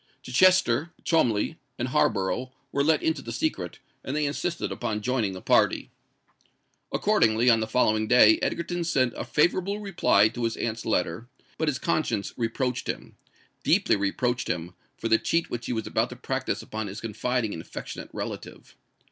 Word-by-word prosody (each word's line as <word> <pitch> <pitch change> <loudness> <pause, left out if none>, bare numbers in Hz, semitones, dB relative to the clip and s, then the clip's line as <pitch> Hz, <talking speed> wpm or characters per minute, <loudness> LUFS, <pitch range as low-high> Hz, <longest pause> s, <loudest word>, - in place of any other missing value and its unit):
Chichester, 160 0 +3
Cholmondeley, 125 -3 +1 0.2
and 125 +1 -2
Harborough 110 +3 +1 0.2
were 140 - +1
let 155 +1 +2
into 160 0 0
the - - -7
secret; 315 0 -2 0.3
and 135 - -4
they 150 0 +1
insisted 165 +4 -2
upon 110 -3 -3
joining 115 -4 0
the 95 - -9
party. - - +2 1.0
Accordingly, 115 +2 +3
on 115 - +4
the 110 - -1
following 110 -2 +2
day 110 -2 +6
Egerton 175 +1 -1
sent 130 -7 +1
a - - -4
favourable 185 +6 +1
reply 175 - +3
to 120 +1 -3
his 115 - -2
aunt's 115 -1 -3
letter; 90 +1 -1 0.3
but 160 - 0
his 145 -4 +1
conscience 155 -9 -1
reproached 125 +2 -2
him—deeply - - -1
reproached 120 +5 -1
him, 85 0 -3 0.2
for 115 - -3
the 115 0 +4
cheat 165 0 0
which 120 0 -4
he - - -1
was 110 -2 -2
about - - 0
to - - -8
practise - - -3
upon 110 -1 -5
his 100 +2 -6
confiding 115 +1 -2
and 80 - -6
affectionate - - -8
relative. - - -7
120 Hz, 165 wpm, -26 LUFS, 110-150 Hz, 1.0 s, day